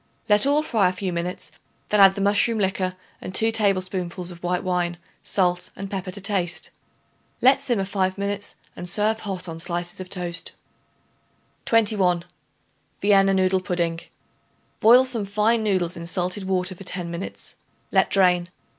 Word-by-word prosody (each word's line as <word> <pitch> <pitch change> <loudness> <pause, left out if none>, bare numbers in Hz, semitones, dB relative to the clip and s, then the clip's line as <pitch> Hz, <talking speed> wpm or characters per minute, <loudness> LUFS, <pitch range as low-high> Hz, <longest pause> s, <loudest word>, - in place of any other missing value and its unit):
Let 210 +4 +5
all 295 +2 +3
fry 215 -10 +2
a - - -4
few 185 -1 -4
minutes; 170 -2 -4 0.4
then 210 - +2
add 195 -1 +7
the 200 - -3
mushroom 205 +3 +2
liquor 190 -2 -1 0.3
and 185 - -4
2 225 0 +4
tablespoonfuls 185 -4 0
of 175 0 -12
white 180 0 -1
wine, 175 -1 -1 0.2
salt 180 -2 0
and 195 0 -7
pepper 190 -2 -4
to 185 - -5
taste. 190 -3 -1 0.7
Let 265 +2 +5
simmer 240 -8 -1
five 190 -1 -1
minutes 200 0 -2 0.2
and 175 0 -6
serve 215 +3 +1
hot 190 -4 -4
on 165 -1 -7
slices 175 +1 -4
of 185 -1 -7
toast. 175 -3 0 1.1
21. 200 -6 +2 0.7
Vienna 195 -1 +4
Noodle 190 0 +2
Pudding. 170 -2 -2 0.8
Boil 245 +4 +7
some 240 -5 -1
fine 215 +3 +1
noodles 185 -5 0
in 170 0 -7
salted 180 +2 -2
water 185 0 0
for 185 - -12
ten 180 -2 -4
minutes; 170 +3 -7 0.4
let - - +3
drain. 180 -2 +3
190 Hz, 155 wpm, -23 LUFS, 180-205 Hz, 1.1 s, add